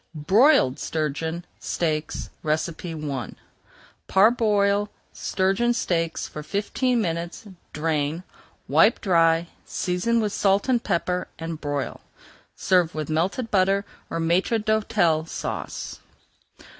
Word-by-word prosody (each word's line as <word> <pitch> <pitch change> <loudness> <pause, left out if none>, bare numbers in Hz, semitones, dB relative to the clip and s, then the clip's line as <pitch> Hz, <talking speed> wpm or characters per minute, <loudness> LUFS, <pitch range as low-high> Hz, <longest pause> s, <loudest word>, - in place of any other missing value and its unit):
BROILED 190 - +4
STURGEON 160 +2 -2
STEAKS 155 -2 -2
I 155 - -3 0.7
Parboil 205 -1 +3 0.2
sturgeon 195 +6 +1
steaks 165 -5 -1
for 150 - -7
fifteen 215 - 0
minutes, 170 0 -3 0.3
drain, 155 +1 -1 0.4
wipe - - +4
dry, 165 -3 +3 0.2
season 180 +6 0
with 210 -2 -1
salt 200 +2 +2
and 245 -3 +2
pepper, 180 +1 -1
and 165 -1 -6
broil. 145 -2 -3 0.5
Serve 180 -4 +2
with 155 0 -3
melted 190 +9 -1
butter 195 +1 +2 0.2
or - - -3
Maître 175 +7 +2
d'Hôtel 205 -7 +1
Sauce. - - -5
175 Hz, 100 wpm, -24 LUFS, 160-205 Hz, 0.7 s, BROILED